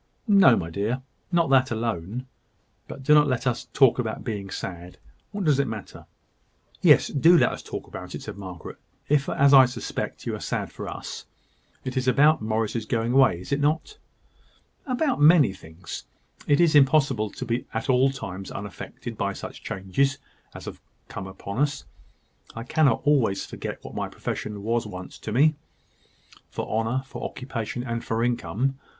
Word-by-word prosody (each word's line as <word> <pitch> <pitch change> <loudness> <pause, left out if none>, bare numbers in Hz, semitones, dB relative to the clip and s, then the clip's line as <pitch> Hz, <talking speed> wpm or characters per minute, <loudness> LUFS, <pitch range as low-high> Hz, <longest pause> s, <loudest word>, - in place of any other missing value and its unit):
"No, 195 - +7
my 85 -4 -3
dear 110 +8 -2 0.3
not 170 -5 +2
that 130 -1 +5
alone. 115 0 -3 0.6
But 135 - -9
do 150 - +5
not 150 -1 +6
let 130 -2 -1
us 125 -2 -1
talk 135 -3 +4
about 110 -3 -3
being 100 -4 -4
sad. 90 -1 -7 0.3
What 205 -1 -4
does 145 -3 +3
it 140 - +2
matter?" 110 -3 -8 0.7
"Yes; - - +6
do 165 +5 +5
let - - +4
us - - -6
talk - - -7
about - - -8
it," - - -7
said - - -7
Margaret, 95 -4 -9 0.3
"if, 145 -1 +2
as 140 0 +4
I 135 -2 +9
suspect, 125 -1 -5
you - - -2
are - - -7
sad - - -3
for - - -7
us. - - -7 0.6
It 130 - -4
is 130 0 0
about 145 +4 +5
Morris's 110 0 -1
going 115 -1 0
away, 130 -10 +4
is 90 - -10
it 140 - +1
not?" 160 - -1 0.9
"About 265 - 0
many 150 - +6
things. 80 0 -9 0.4
It 145 - +4
is 170 -2 +4
impossible 135 -6 +4
to 125 - -7
be 120 +1 -2
at 110 0 -3
all 130 +1 +4
times 95 -8 -6
unaffected 100 0 -7
by - - 0
such - - -8
changes 115 +9 -1 0.4
as - - -9
have - - -8 0.3
come 95 - -6
upon 100 +3 -6
us; 145 -1 0 0.7
I 115 - -5
cannot 135 0 +2
always 130 -10 +2
forget - - -7
what - - -9
my - - -3
profession 105 -2 -5
once 115 0 0
was 90 -2 -9
to 110 - -6
me, 145 +7 +4 1.0
for - - -5
honour, 115 +4 -1
for 135 - -8
occupation, 125 -2 -4
and 115 -1 -3
for 115 0 -1
income. 125 +2 -1
125 Hz, 175 wpm, -25 LUFS, 110-140 Hz, 1.0 s, I